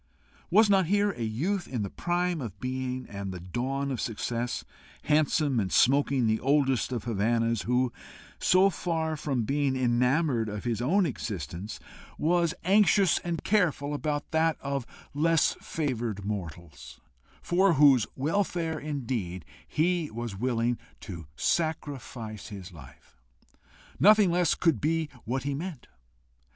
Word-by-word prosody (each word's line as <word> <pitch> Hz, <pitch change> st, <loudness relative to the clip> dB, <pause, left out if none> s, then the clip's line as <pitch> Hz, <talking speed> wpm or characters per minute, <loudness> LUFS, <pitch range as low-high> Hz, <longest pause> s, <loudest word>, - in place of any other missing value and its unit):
Was 215 Hz, +4 st, +6 dB
not 195 Hz, -4 st, +3 dB
here 205 Hz, +2 st, +2 dB
a 125 Hz, -, -9 dB
youth 155 Hz, -, -1 dB
in 120 Hz, -5 st, -3 dB
the 100 Hz, -, -4 dB
prime 175 Hz, -2 st, -1 dB
of 105 Hz, -6 st, -7 dB
being 130 Hz, 0 st, -3 dB
and 100 Hz, -1 st, -5 dB
the 90 Hz, -, -6 dB
dawn 130 Hz, +10 st, -3 dB
of 130 Hz, -, -2 dB
success, 120 Hz, +1 st, -3 dB, 0.4 s
handsome, 150 Hz, -3 st, +2 dB
and 95 Hz, -3 st, -1 dB
smoking 135 Hz, -1 st, +3 dB
the 110 Hz, 0 st, +2 dB
oldest 135 Hz, -2 st, +2 dB
of 120 Hz, -4 st, -3 dB
Havannahs, 115 Hz, 0 st, 0 dB
who, 125 Hz, 0 st, +1 dB, 0.5 s
so 190 Hz, +2 st, +4 dB
far 160 Hz, -3 st, -2 dB
from 135 Hz, -5 st, -1 dB
being 140 Hz, +2 st, 0 dB
enamoured 125 Hz, 0 st, +1 dB
of 105 Hz, 0 st, -5 dB
his 120 Hz, -2 st, -1 dB
own 180 Hz, +10 st, +3 dB
existence, 100 Hz, -, -5 dB, 0.4 s
was 170 Hz, +1 st, +1 dB
anxious 195 Hz, -1 st, +4 dB
and 170 Hz, -2 st, -4 dB
careful 165 Hz, -8 st, +1 dB
about 145 Hz, 0 st, -3 dB
that 160 Hz, 0 st, +2 dB
of 140 Hz, -3 st, -3 dB, 0.3 s
less 160 Hz, +2 st, +3 dB
favoured 120 Hz, -9 st, -3 dB
mortals, 85 Hz, -6 st, -7 dB, 0.4 s
for 185 Hz, +1 st, +3 dB
whose 135 Hz, -6 st, +5 dB
welfare 165 Hz, +1 st, -1 dB
indeed 120 Hz, -, -4 dB, 0.2 s
he 170 Hz, 0 st, 0 dB
was 115 Hz, -2 st, -5 dB
willing 120 Hz, +2 st, 0 dB, 0.2 s
to 85 Hz, -7 st, -8 dB
sacrifice 125 Hz, -, -2 dB
his 100 Hz, -3 st, -9 dB
life? 70 Hz, -4 st, -16 dB, 0.8 s
nothing 210 Hz, -2 st, +6 dB
less 175 Hz, -2 st, +2 dB
could 160 Hz, -, +1 dB
be 160 Hz, 0 st, 0 dB, 0.2 s
what 130 Hz, +4 st, -2 dB
he 140 Hz, 0 st, -2 dB
meant. 155 Hz, -2 st, -6 dB
135 Hz, 135 wpm, -28 LUFS, 115-165 Hz, 0.8 s, Was